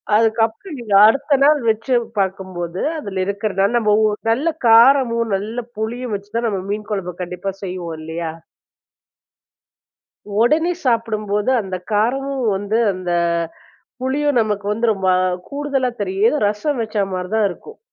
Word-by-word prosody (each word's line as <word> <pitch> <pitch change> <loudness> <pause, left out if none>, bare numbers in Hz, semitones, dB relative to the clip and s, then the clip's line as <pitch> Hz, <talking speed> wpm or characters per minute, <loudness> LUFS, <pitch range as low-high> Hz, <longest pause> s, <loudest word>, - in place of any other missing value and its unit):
அதுக்கப்பறம் 225 - +1
நீங்க 220 -4 -4
அடுத்த 280 +5 +2
நாள் 295 0 +5
வச்சு 225 +4 0 0.3
பார்க்கும்போது 185 -2 -3 0.2
அதில 195 -8 -4
இருக்கிறதுன்னா, 200 -1 0
நம்ம 215 -3 +2
ஊ - - +5 0.3
நல்ல 275 +9 +1 0.2
காரமும், 230 -1 +5
நல்ல 220 +5 -4 0.2
புளியும் 235 +2 -3
வச்சு 200 +1 -9
தான் 235 0 0
நம்ம 195 -3 -2
மீன் 210 +1 -4
கொழம்பு 185 -3 -3
கண்டிப்பா 180 +2 -4
செய்வோம் 180 -3 -5
இல்லையா? 160 +1 -4 2.1
உடனே 315 +8 +3
சாப்பிடும்போது, 215 -3 0
அந்த 190 -2 -5 0.2
காரமும் 265 +5 0
வந்து 205 +3 -1 0.2
அந்த 185 -1 -4 0.9
புளியும் 285 +1 +1
நமக்கு 210 -2 -1
வந்து, 225 +3 0
ரொம்ப 190 -1 -1 0.4
கூடுதலா 280 -3 -1
தெரியும். 205 +9 +1
ரசம் 235 +6 -1
வச்சா 215 -2 -1
மாரி 180 0 -4
தான் 220 -2 +3
இருக்கும். 445 - -11
215 Hz, 130 wpm, -19 LUFS, 195-250 Hz, 2.1 s, நாள்